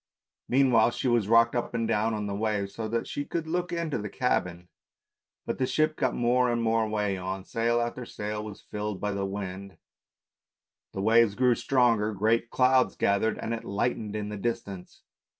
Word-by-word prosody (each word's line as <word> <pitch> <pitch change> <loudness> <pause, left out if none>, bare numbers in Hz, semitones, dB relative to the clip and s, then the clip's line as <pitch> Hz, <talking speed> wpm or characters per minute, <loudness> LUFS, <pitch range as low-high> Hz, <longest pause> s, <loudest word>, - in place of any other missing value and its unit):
Meanwhile 125 -4 +4
she - - -2
was 120 -5 +2
rocked 115 +1 +4
up 120 0 -2
and 115 -1 0
down 110 0 +1
on 105 -1 -3
the 100 - -3
waves, 105 -1 -1
so 110 -1 -4
that 115 +1 -1
she 145 - -4
could 165 +2 -3
look 175 +2 -2
into 165 -6 -2
the 105 0 -5
cabin; 90 -9 -1 0.8
but - - -3
the 130 - +1
ship 155 +2 +1
got - - 0
more 125 +1 +2
and 120 -1 0
more 110 -1 +1
way 105 -2 -1
on, 95 +1 -4
sail 115 +3 0
after 120 +1 -3
sail 105 -2 -5
was 105 -2 -10
rilled 105 -2 -3
by 105 - -2
the 100 -1 -2
wind, 95 0 -6 1.1
the 95 - -4
waves 110 -1 +4
grew 125 0 +4
stronger, 115 -4 +2
great 115 +4 +1
clouds 130 0 +3
gathered, 100 +3 +1
and 115 - -3
it 115 - -4
lightened 105 +1 -2
in 105 -1 -3
the 105 - -5
distance. 100 -4 -5
110 Hz, 185 wpm, -27 LUFS, 105-120 Hz, 1.1 s, Meanwhile